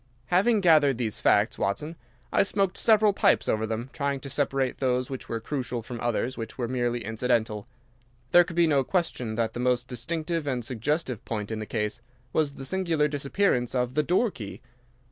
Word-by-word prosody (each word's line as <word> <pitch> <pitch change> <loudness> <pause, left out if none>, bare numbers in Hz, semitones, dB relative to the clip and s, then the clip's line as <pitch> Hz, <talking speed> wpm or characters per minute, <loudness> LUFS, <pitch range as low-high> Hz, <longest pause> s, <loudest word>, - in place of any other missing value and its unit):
"Having 205 +4 +4
gathered 150 -7 +5
these 115 -4 -2
facts, - - +3
Watson, 150 +12 -2 0.4
I - - +5
smoked 195 -1 0
several 215 -2 +4
pipes - - +3
over 110 0 0
them, 115 +4 -4
trying 140 -2 -1
to 140 - -7
separate 135 -2 0
those 125 -1 0
which 130 - -6
were 115 - -2
crucial 125 -1 -4
from 120 +1 -7
others 120 +2 -1
which 115 -1 -6
were 120 -2 -1
merely 120 -2 -1
incidental. 110 -1 -1 0.6
There 175 - +8
could 170 -1 -8
be 170 0 +5
no 145 -4 +3
question 130 - -1
that 115 -1 -1
the - - -5
most 125 0 +1
distinctive 160 +5 -3
and 125 -4 -1
suggestive 130 +1 -2
point 105 -1 -4
in 110 - -3
the 110 - -5
case 105 -2 -2 0.3
was 150 -3 +1
the 135 - -7
singular 165 -2 +1
disappearance 140 -3 0
of 125 0 0
the 150 - +3
door 185 +8 +2
key. 110 - -9
130 Hz, 185 wpm, -27 LUFS, 115-155 Hz, 0.6 s, There